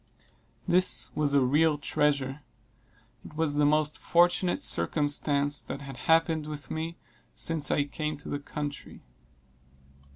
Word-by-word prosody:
This 185 +1 +2
was 145 -2 +1
a 140 - +5
real 150 +3 +3
treasure 140 -1 0 0.8
it 150 - -12
was 160 -2 0
the 145 0 +3
most 150 0 +1
fortunate 175 +1 +2
circumstance 145 -1 +1
that 140 - -7
had 135 -1 -8
happened 160 -1 +3
with 150 -2 -8
me 165 +1 -4 0.4
since 160 -3 -1
I 145 - +2
came 150 +1 -4
to 145 - -10
the 145 - -3
country. 145 0 -7
150 Hz, 130 wpm, -28 LUFS, 145-160 Hz, 0.8 s, a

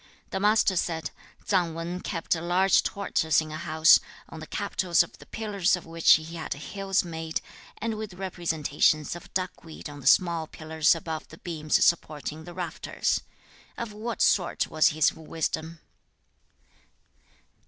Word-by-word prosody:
The 190 - -1
Master 210 -1 +3
said, 165 -2 -1 0.3
'Tsang 175 -5 +1
Wan 170 +2 -4
kept 165 -4 -2
a 165 - -2
large 180 +3 +3
tortoise 160 -6 +1
in 155 -1 -4
a - - -5
house, 160 0 +5 0.3
on 160 - -9
the 155 - -9
capitals 190 -4 +1
of - - -14
the - - -14
pillars 200 -4 0
of 180 - -9
which 165 0 +5
he 155 - +3
had 160 - -3
hills 195 +6 -1
made, 160 -2 -4 0.4
and 225 -1 -2
with 215 -3 -6
representations 160 -5 0
of 175 - -11
duckweed 180 -4 -4
on 145 - -10
the 135 - -5
small 170 -1 +4
pillars 160 0 +1
above 160 -1 -5
the - - -13
beams 155 -4 +1
supporting 155 -2 -1
the 175 - -9
rafters. 180 -2 -2 0.6
Of 235 -3 -5
what 220 +2 -2
sort 180 -3 +2
was 155 0 +4
his 155 -1 +3
wisdom?' 160 0 -4
170 Hz, 155 wpm, -27 LUFS, 160-190 Hz, 0.6 s, house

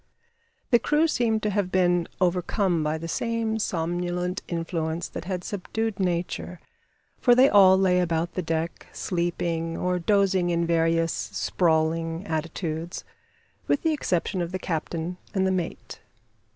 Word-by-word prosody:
The 240 - +6
crew 300 +7 +2
seemed 230 -7 +1
to 210 - +1
have 195 -2 -1
been 175 -2 +2
overcome 180 0 +1
by 155 +1 0
the 165 +1 -6
same 225 +3 -1
somnolent 175 0 -2
influence 165 -1 -2
that - - -7
had 180 -1 -3
subdued 210 +2 -3
Nature, 180 -1 -2 0.6
for 245 -2 +5
they 260 +2 +7
all 190 -5 +7
lay 185 -1 +3
about 170 -1 0
the 185 - -2
deck 165 0 -3
sleeping 170 -1 -2
or 180 0 0
dozing 190 -1 +2
in 170 0 +1
various 165 0 +2
sprawling 165 +1 0
attitudes, 165 0 -3 0.6
with 285 - +1
the 320 -1 +2
exception 185 - -1
of 170 0 -3
the 185 - -2
captain 170 0 -3 0.2
and 190 -1 +2
the 190 - +2
mate. 180 -3 -4
175 Hz, 140 wpm, -26 LUFS, 165-190 Hz, 0.6 s, they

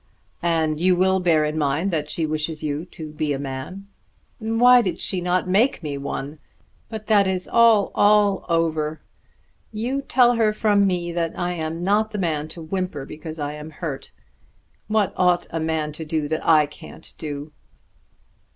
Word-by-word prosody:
"And 160 -2 0
you 185 0 +4
will 190 +1 +2
bear 165 -4 +3
in 150 +1 -2
mind 150 +6 0
that 150 -3 -2
she 160 +1 -1
wishes 155 0 -3
you 150 +2 -2
to 155 -4 -9
be 150 -1 -1
a - - -2
man." 140 +8 -6 0.5
"Why 240 +3 +5
did 185 -6 -3
she 185 -2 0
not 180 +1 0
make 205 +3 +2
me 145 -2 -3
one? 140 +1 -5 0.5
But 220 -2 -6
that 205 -3 +4
is 185 -1 -2
all, 230 -4 +4
all 205 -1 +3
over. 160 -2 0 0.7
You 240 +6 -2
tell 245 -3 +3
her 215 -2 +3
from 205 -2 +3
me 175 -2 -1
that 170 -1 -2
I 175 0 -1
am 165 0 -4
not 210 +3 +2
the 215 - -5
man 155 -5 -1
to 165 +1 -9
whimper 180 -4 -3
because 155 +2 -8
I 145 -1 -3
am 150 +1 -8
hurt. 155 -3 -6 0.8
What 215 -3 +1
ought 180 -1 +2
a 165 - -2
man 160 -1 -1
to 155 +2 -7
do 155 -1 -2
that 160 - -2
I 155 -2 +5
can't 150 +2 -13
do?" 145 -1 -6
170 Hz, 175 wpm, -22 LUFS, 155-195 Hz, 0.8 s, Why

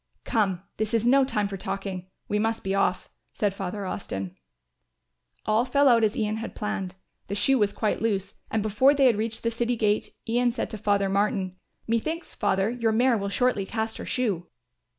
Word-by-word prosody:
"Come, 195 -5 0
this 215 +1 0
is 230 0 +1
no 270 +3 +6
time 210 -6 0
for 195 -1 -5
talking, 190 -1 -4 0.2
we 210 - 0
must 225 +1 0
be 195 - -1
off," 195 -2 +1 0.2
said 205 -2 0
Father 195 +1 -4
Austin. 95 - -4 1.1
All 215 +2 +3
fell 280 +3 +3
out 235 -3 +5
as 215 0 +2
Ian 215 -1 0
had 225 +1 -6
planned; 210 -4 -3 0.3
the 200 - -3
shoe 255 +6 +3
was 205 -1 +3
quite 215 0 -1
loose 200 -3 -1 0.2
and 220 -2 0
before 240 +7 +4
they 275 -1 +4
had 245 -4 +5
reached 220 +1 -2
the 230 - +1
city 235 +1 0
gate, 210 -2 +1 0.2
Ian 240 +1 +2
said 240 - -3
to 220 - -5
Father 200 -1 +2
Martin, 195 -1 0 0.3
"Methinks, 310 +10 -2
Father, 200 0 +1
your 230 -2 0
mare 240 +3 +3
will 200 -2 -2
shortly 245 -1 +1
cast 220 0 -2
her - - -5
shoe." 200 -9 -1
215 Hz, 190 wpm, -26 LUFS, 200-230 Hz, 1.1 s, no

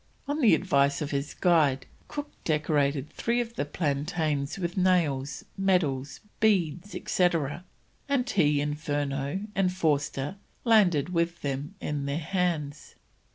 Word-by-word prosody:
On 290 +2 -1
the 220 - +6
advice 140 -5 +2
of 145 - -4
his 140 +1 -2
guide, 155 -7 +3 0.2
Cook 290 0 -5
decorated 150 -2 +1
three 235 +7 0
of 235 -1 -3
the 185 - -2
plantains 150 0 -1
with 175 -2 -3
nails, 155 -8 +1
medals, 150 -9 +1 0.2
beads, 190 -3 +1
etc., 170 -2 0 0.4
and 265 -3 +1
he, 145 -6 +2
Furneaux, 145 +1 -2
and 190 -2 +2
Forster, 150 -2 -1 0.3
landed 185 - +4
with 170 -1 -1
them 140 +6 -3
in 145 -2 -3
their 140 +1 -1
hands. 165 -4 -2
155 Hz, 125 wpm, -28 LUFS, 140-185 Hz, 0.4 s, the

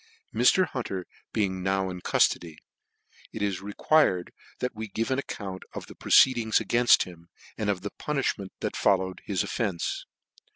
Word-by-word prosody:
Mr. 125 +11 +5
Hunter 95 - -4 0.3
being 95 -3 0
now 95 0 0
in 90 -1 -7
cuftody, 85 -2 +1 0.8
it 110 - -4
is 100 -3 -1
requi 105 +3 +3
fite - - -18 0.3
that 125 - -2
we 110 0 -5
give 115 +5 -2
an 130 - +1
account 95 -8 -6
of - - -6
the - - -12
proceedings 120 -4 +4
againft 120 0 +4
him, 85 -1 -13 0.3
and 105 -1 -2
of 95 -3 0
the 100 - -5
punifhment 135 -9 -2
that - - -2
followed 95 -2 +1
his 95 -3 0
offence. 100 -7 -2
100 Hz, 160 wpm, -27 LUFS, 95-120 Hz, 0.8 s, Mr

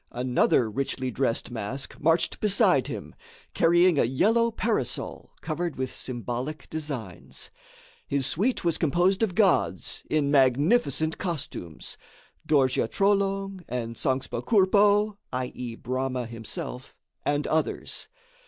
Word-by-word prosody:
Another 125 -1 +2
richly 130 +3 -2
dressed 120 0 -1
mask 120 +4 -5
marched 165 +3 +2
beside 205 -2 +3
him, - - -6 0.4
carrying 175 -1 +4
a - - +5
yellow 220 - +3
parasol 225 - -2
covered 165 0 -3
with 130 -1 -4
symbolic 125 +4 -5
designs. 140 - -6 0.6
His 140 -2 0
suite 200 - 0
was 170 - +1
composed 175 +6 +2
of 205 -6 +1
gods, 95 - +2
in 145 -2 +1
magnificent 150 - +3
costumes; 110 - -5 0.5
Dorje 130 -6 +3
Trolong 195 - +1
and 115 -1 -3
Sangspa 130 -1 -1
Kourpo 205 0 +4 0.2
(i.e., 125 -2 -4
Brahma 130 +1 -2
himself), 125 - -7 0.3
and 145 0 0
others. 160 0 -1
145 Hz, 110 wpm, -27 LUFS, 125-185 Hz, 0.6 s, a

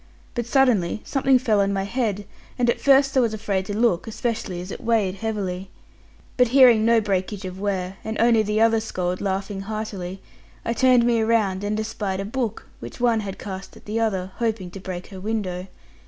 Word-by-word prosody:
But 240 -2 -3
suddenly 240 -8 +2
something 270 -1 +3
fell 220 -5 +2
on 200 0 +1
my 195 -1 -1
head; 205 -2 -2 0.3
and 240 -1 +3
at - - -5
first 275 0 +4
I - - +5
was 230 -3 +1
afraid 200 -3 -2
to 205 -1 -3
look, 225 -6 +2
especially 220 -5 -3
as 180 +2 -7
it - - -7
weighed 220 -5 +2
heavily. 195 -3 -3 0.7
But 250 -1 +5
hearing 245 -3 +6
no 230 0 +5
breakage 195 0 -2
of 185 0 -7
ware, 190 -2 -2
and 220 0 -4
only 230 -1 +5
the 215 +1 0
other 225 0 +4
scold 185 -4 -3
laughing 195 0 -2
heartily, 195 -3 -5 0.5
I 230 - 0
turned 250 0 +4
me 235 -1 +3
about 215 -4 +1
and 210 +1 -1
espied 210 -3 -3
a 195 - -3
book, 225 0 -3
which - - -9
one 235 -2 +3
had 195 -3 -5
cast 190 -1 -8
at - - -18
the 215 +2 -2
other, 190 -5 -1
hoping 220 -6 -2
to 195 - -8
break 185 -1 -6
her 190 - -9
window. 190 -3 -3
215 Hz, 200 wpm, -23 LUFS, 190-230 Hz, 0.7 s, hearing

